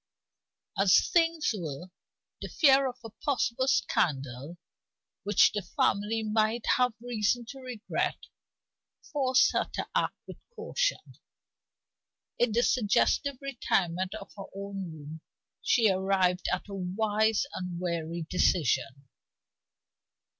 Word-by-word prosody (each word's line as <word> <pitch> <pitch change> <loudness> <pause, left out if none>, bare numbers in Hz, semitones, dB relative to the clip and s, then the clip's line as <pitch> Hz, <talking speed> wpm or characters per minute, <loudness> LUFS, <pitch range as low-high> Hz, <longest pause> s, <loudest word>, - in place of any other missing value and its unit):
As 195 -2 +4
things 330 -5 +2
were, 175 -1 -6 0.5
the - - -5
fear 275 -3 +4
of 250 - -9
a 225 - -9
possible 260 -2 0
scandal 140 - 0 0.6
which 205 +2 +4
the 205 - -2
family 205 +5 0
might 215 +1 0
have 250 -2 +2
reason 235 0 -1
to 270 - -9
regret 250 -4 -3 1.0
forced 260 -3 +3
her - - -1
to - - -3
act - - 0
with - - -9 0.2
caution. - - -2 1.2
In 240 -2 +3
the 235 +3 +2
suggestive 255 +4 +2
retirement 190 -9 -1
of - - -9
her 195 -2 -8
own 195 -3 -6
room, 155 0 -10 0.4
she 230 -4 +3
arrived 185 -1 +1
at - - -2
a 200 - -8
wise 210 +4 0
and 180 -2 -5
wary 170 -2 -3
decision. 140 -6 +1
205 Hz, 115 wpm, -29 LUFS, 180-245 Hz, 1.2 s, As